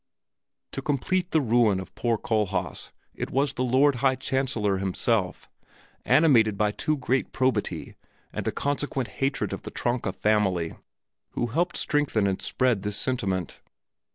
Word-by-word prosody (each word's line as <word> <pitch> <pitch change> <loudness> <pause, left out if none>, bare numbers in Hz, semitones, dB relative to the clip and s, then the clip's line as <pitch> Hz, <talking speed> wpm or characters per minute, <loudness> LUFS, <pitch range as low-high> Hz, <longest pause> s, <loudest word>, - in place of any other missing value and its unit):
To - - -4
complete 175 +6 0
the 160 - +2
ruin 115 -5 +3
of 95 - -9
poor 120 -2 0
Kohlhaas, 105 -3 -2 0.2
it - - -4
was 140 +1 +1
the 125 - -1
Lord 130 +2 +3
High 130 +1 +2
Chancellor 130 -6 0
himself, 95 0 -1 0.6
animated 115 -10 +4
by 105 0 +2
too 155 +8 -1
great 130 0 0
probity, 130 0 -1 0.4
and - - -4
a - - +2
consequent 140 -3 -2
hatred 135 +1 0
of - - -5
the - - -7
Tronka 120 -5 -1
family, 95 -4 +1 0.6
who - - 0
helped 175 +3 0
strengthen 145 -8 +1
and 95 -1 -1
spread 125 -6 +1
this 105 0 -2
sentiment. 95 -9 -2
120 Hz, 145 wpm, -26 LUFS, 105-135 Hz, 0.6 s, animated